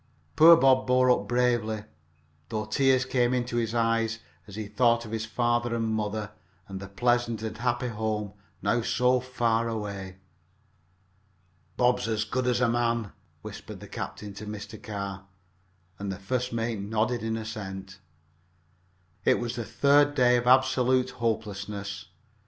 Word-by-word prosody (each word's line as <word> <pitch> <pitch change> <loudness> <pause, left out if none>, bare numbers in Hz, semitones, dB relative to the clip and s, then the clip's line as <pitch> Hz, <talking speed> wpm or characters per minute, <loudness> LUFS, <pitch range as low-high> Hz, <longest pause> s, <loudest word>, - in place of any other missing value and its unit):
Poor 165 +1 +9
Bob 130 -3 +4
bore 125 0 +4
up - - +1
bravely, 120 -3 +1 0.7
though 110 -1 -2
tears 130 +3 +2
came 125 -1 +1
into 120 -1 -2
his 115 -1 -1
eyes 115 -1 +1 0.3
as 100 - -10
he 110 0 -4
thought 115 +2 +2
of 110 - -9
his 110 -1 -3
father 120 +1 0
and 115 -1 -1
mother, 105 -1 -2 0.4
and 95 -1 -6
the 100 - -8
pleasant 120 +2 0
and 110 - -5
happy 120 0 0
home 105 -2 -3 0.3
now 115 +4 +2
so 125 +2 +2
far 115 -2 0
away. 100 -4 -5 1.6
"Bob's 125 -1 +2
as 110 -1 0
good 125 +4 -2
as 125 0 +1
a 125 - +4
man," 115 -2 0 0.3
whispered - - -9
the - - -10
captain 105 -1 -6
to 105 +2 -9
Mr. 105 +1 -7
Carr, 100 -2 -6 0.7
and 100 0 -3
the 95 - -5
first 125 +6 -2
mate 115 -1 -2
nodded 110 +4 -1
an 110 0 -2
assent. 95 -4 -7 1.2
It - - +4
was 120 0 -3
the 120 - -3
third 145 +6 +3
day 125 -2 +5
of 120 0 0
absolute 130 0 +4
hopelessness. 100 -3 -4
115 Hz, 150 wpm, -27 LUFS, 105-125 Hz, 1.6 s, Poor